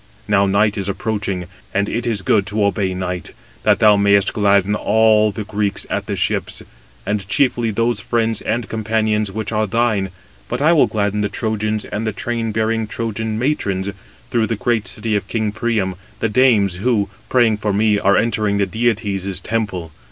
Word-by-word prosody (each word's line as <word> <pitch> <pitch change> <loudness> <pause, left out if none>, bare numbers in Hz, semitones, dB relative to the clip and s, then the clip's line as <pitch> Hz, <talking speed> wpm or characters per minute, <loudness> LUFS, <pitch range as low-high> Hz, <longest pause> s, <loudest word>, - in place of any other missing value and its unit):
Now 100 -1 +3
night 105 +2 +2
is 100 0 -3
approaching, 100 -3 -2 0.3
and 100 +1 +2
it 120 +2 -2
is 105 -4 -1
good 95 +2 +2
to 105 +2 0
obey 95 -1 0
night, 90 -1 -4 0.3
that 105 -2 +3
thou 105 -1 +5
mayest 100 0 +3
gladden 100 -1 +3
all 110 0 +3
the 105 +1 -5
Greeks 105 -1 -2
at - - -2
the - - -2
ships, - - -2 0.4
and 100 -1 -2
chiefly 120 0 +2
those 115 +3 0
friends 115 -1 0
and 120 -2 -2
companions 110 -1 0
which 110 +1 -4
are 110 -1 0
thine; 110 -3 +1 0.4
but - - -2
I 155 +4 +4
will 160 - +5
gladden 105 -1 -1
the 105 - 0
Trojans 110 0 -2
and 110 +2 -4
the 110 - -1
train 115 +1 -2
bearing 110 0 0
Trojan 110 0 -3
matrons, 100 -7 -1 0.4
through 115 -2 +2
the 115 - -1
great 110 0 0
city 110 0 -2
of 100 - -2
king 110 -2 -1
Priam, 110 -3 -1 0.3
the 115 - 0
dames 105 -6 +3
who, 105 0 +1 0.2
praying 120 -4 +3
for 105 0 -1
me, 105 +1 +2
are 100 - +3
entering 105 -3 +1
the 100 - +2
deities' 100 -3 -1
temple. 100 -7 -3
105 Hz, 180 wpm, -19 LUFS, 100-115 Hz, 0.4 s, thou